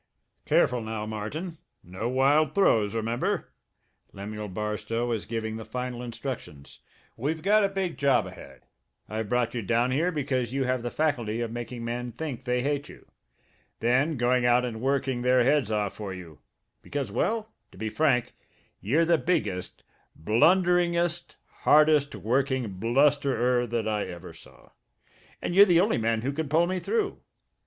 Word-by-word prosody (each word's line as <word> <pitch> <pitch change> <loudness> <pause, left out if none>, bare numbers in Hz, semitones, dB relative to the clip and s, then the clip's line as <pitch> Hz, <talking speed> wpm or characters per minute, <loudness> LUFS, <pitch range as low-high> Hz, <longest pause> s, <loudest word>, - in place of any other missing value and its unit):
"Careful 125 -1 +3
now, 110 -1 -4
Martin! 145 - -5 0.2
No 95 +7 -4
wild 140 +4 +3
throws, 115 - +3
remember!" 115 +2 -1 0.6
Lemuel 105 +2 -6
Barstow 105 +4 -3
was 115 -3 -2
giving 110 -1 -3
the 110 - -7
final 125 +1 -5
instructions. 120 - -7 0.4
"We've 155 +6 -3
got 210 +2 +4
a 200 - +2
big 190 -3 -3
job 135 -5 +3
ahead. - - -12 0.4
I've 110 -1 -4
brought 120 -2 +1
you 120 - -2
down 115 +5 +1
here 165 +7 +1
because 130 -6 -2
you 135 0 0
have 130 -1 0
the 120 - -3
faculty 120 -7 -1
of 115 -1 -3
making 120 0 -6
men 120 +1 -3
think 130 0 -6
they 125 0 0
hate 145 +1 -1
you - - -14 0.7
then 130 +6 +2
going 120 +1 +2
out 120 +1 +4
and 110 -2 -5
working 135 -1 0
their 125 0 +4
heads 135 -3 +2
off 105 -2 -1
for 105 -3 -6
you, 85 -5 -10 0.4
because 140 -2 -4
well, 220 -1 -1 0.2
to - - -16
be 110 +3 -3
frank, 125 +1 +1 0.5
you're 145 +12 +2
the 165 -1 +3
biggest, 105 - -2 0.3
blunderingest, 175 - +2 0.3
hardest 150 -1 +4
working 125 -4 -1
blusterer 125 0 +2
that 115 -1 -2
I 105 -1 0
ever 85 -1 -9
saw 80 - -16 0.7
and - - -2
you're 195 +3 +9
the 175 -4 +4
only 205 - +1
man 115 0 0
who 135 - 0
can 150 0 -3
pull 160 +3 +4
me 185 +1 -2
through. 440 - -1
125 Hz, 160 wpm, -27 LUFS, 110-150 Hz, 0.7 s, you're